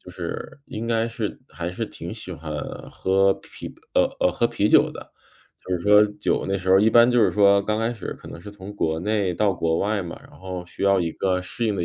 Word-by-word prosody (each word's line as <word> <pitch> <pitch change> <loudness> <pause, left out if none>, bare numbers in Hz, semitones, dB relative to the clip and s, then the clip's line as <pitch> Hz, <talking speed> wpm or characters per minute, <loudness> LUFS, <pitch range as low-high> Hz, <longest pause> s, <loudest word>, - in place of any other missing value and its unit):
就 - - -12
是 - - -6
应 110 - -6
该 115 -1 +1
是 115 -2 -4
还 85 0 -5
是 90 - -4
挺 - - -8
喜 - - -7
欢 75 +1 -7 0.4
喝 95 +1 +2
啤 - - -10
啤 - - -14 0.2
呃 - - +5 0.2
呃， 90 - +2
喝 120 +6 +1
啤 105 - 0
酒 - - +5
的， - - -11 0.5
就 95 - -5
是 - - -7
说 105 +3 +6
酒 - - 0
那 95 0 0
时 95 0 -6
候 95 - +7
一 110 +2 +4
般 120 +1 +6
就 120 -1 +3
是 105 - +4
说， 100 -1 +4
刚 105 +2 -1
开 115 +2 -1
始 105 - -6
可 - - -14
能 85 - -9
是 105 - -9
从 100 0 -10
国 80 -5 -1
内 100 +1 0
到 100 +3 +1
国 80 -2 0
外 100 -1 0
嘛， 85 - -7
然 - - -21
后 90 -1 -6
需 90 - -9
要 100 -1 +4
一 85 -2 -1
个 95 -1 0
适 105 +6 -4
应 105 -3 0
的 90 - -1
100 Hz, 270 characters per minute, -23 LUFS, 90-105 Hz, 0.5 s, 候